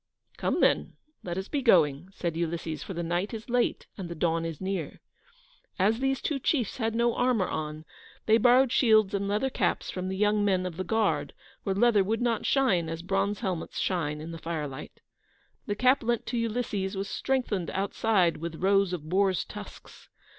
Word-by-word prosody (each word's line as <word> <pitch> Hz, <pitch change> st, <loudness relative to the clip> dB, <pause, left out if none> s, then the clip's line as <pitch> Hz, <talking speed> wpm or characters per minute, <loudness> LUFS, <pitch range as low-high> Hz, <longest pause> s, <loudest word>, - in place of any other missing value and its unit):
"Come, -, -, -1 dB
then, -, -, +2 dB, 0.3 s
let 175 Hz, 0 st, -5 dB
us 190 Hz, +1 st, -3 dB
be 285 Hz, -, -1 dB
going," 170 Hz, -, +3 dB
said 170 Hz, -4 st, -3 dB
Ulysses, 165 Hz, -2 st, -3 dB
"for 190 Hz, -, -6 dB
the 170 Hz, -, -2 dB
night 175 Hz, +6 st, -1 dB
is 225 Hz, +3 st, -8 dB
late, 245 Hz, 0 st, +1 dB
and 180 Hz, -3 st, -5 dB
the 170 Hz, -, -5 dB
dawn 165 Hz, 0 st, 0 dB
is 165 Hz, -3 st, -5 dB
near." 190 Hz, -5 st, -4 dB, 0.8 s
As 210 Hz, +4 st, +2 dB
these 270 Hz, 0 st, 0 dB
two 290 Hz, -3 st, -1 dB
chiefs 255 Hz, -5 st, 0 dB
had 225 Hz, -2 st, -1 dB
no 235 Hz, 0 st, +2 dB
armour 245 Hz, -7 st, +2 dB
on, 155 Hz, 0 st, -4 dB, 0.4 s
they 220 Hz, +1 st, +5 dB
borrowed 250 Hz, +2 st, +5 dB
shields 215 Hz, -5 st, +4 dB
and 200 Hz, 0 st, -1 dB
leather 215 Hz, +7 st, 0 dB
caps -, -, -1 dB
from 185 Hz, 0 st, -4 dB
the 190 Hz, -, -3 dB
young 210 Hz, +1 st, +2 dB
men 190 Hz, -2 st, +1 dB
of 175 Hz, -3 st, -5 dB
the 185 Hz, -, -2 dB
guard, 220 Hz, +2 st, 0 dB, 0.3 s
for 195 Hz, -2 st, -1 dB
leather 215 Hz, -1 st, +4 dB
would 220 Hz, +3 st, -1 dB
not 235 Hz, -3 st, 0 dB
shine 195 Hz, -12 st, +2 dB
as 165 Hz, +1 st, -5 dB
bronze 195 Hz, +3 st, 0 dB
helmets 185 Hz, -6 st, -3 dB
shine 150 Hz, -5 st, -1 dB
in 160 Hz, +2 st, -7 dB
the 165 Hz, -, -7 dB
firelight. 150 Hz, -4 st, -6 dB, 0.7 s
The 205 Hz, -, -1 dB
cap 255 Hz, +5 st, +4 dB
lent 235 Hz, -1 st, -1 dB
to 240 Hz, -, -3 dB
Ulysses 215 Hz, -4 st, -2 dB
was 195 Hz, +1 st, -2 dB
strengthened 235 Hz, -8 st, -1 dB
outside 195 Hz, -2 st, +1 dB
with 165 Hz, 0 st, -5 dB
rows 195 Hz, +1 st, +2 dB
of 155 Hz, -4 st, -5 dB
boars' 190 Hz, +1 st, +1 dB
tusks. -, -, -11 dB
195 Hz, 190 wpm, -28 LUFS, 170-225 Hz, 0.8 s, they